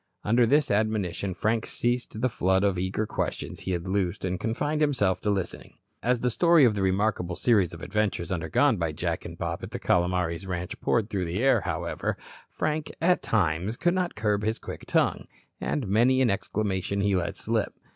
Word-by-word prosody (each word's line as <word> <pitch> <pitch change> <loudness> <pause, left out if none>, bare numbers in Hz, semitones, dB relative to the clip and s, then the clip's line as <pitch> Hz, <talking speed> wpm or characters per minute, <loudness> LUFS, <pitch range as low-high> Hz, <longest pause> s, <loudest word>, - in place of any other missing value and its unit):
Under 115 +2 +3
this 145 +2 +3
admonition 100 -3 0
Frank 110 +4 0
ceased 120 -2 -2
the 130 - +3
flood 95 -4 +1
of 100 -3 +1
eager 95 +4 -1
questions - - -4
he 95 - -4
had 85 +1 -3
loosed 95 -2 -1
and 90 0 -2
confined 145 +7 -1
himself 105 -12 +2
to 105 - -1
listening. 95 -4 -3 0.3
As 125 0 +1
the 125 - +1
story 170 +2 +5
of 115 - +4
the 100 - -2
remarkable 95 -2 0
series 100 -3 +3
of 85 - -10
adventures 105 -4 -1
undergone 95 - +2
by 85 -3 -1
Jack - - -3
and - - -8
Bob - - -3
at - - -6
the - - -5
Calomares 90 0 0
ranch 90 -1 -4
poured 115 -2 +1
through 95 -3 -1
the 90 +8 -2
air, 135 - +4
however, - - -2 0.3
Frank, 155 0 -2
at 180 +2 +3
times, 95 +1 0
could 175 - +2
not 185 -2 -1
curb 105 -1 0
his 110 +1 0
quick - - -8
tongue, - - +1 0.3
and 135 -8 -2
many 120 +6 +3
an 130 -3 +3
exclamation 100 -1 -1
he 100 -1 +2
let 85 -2 -1
slip. - - -1
105 Hz, 190 wpm, -27 LUFS, 90-120 Hz, 0.3 s, story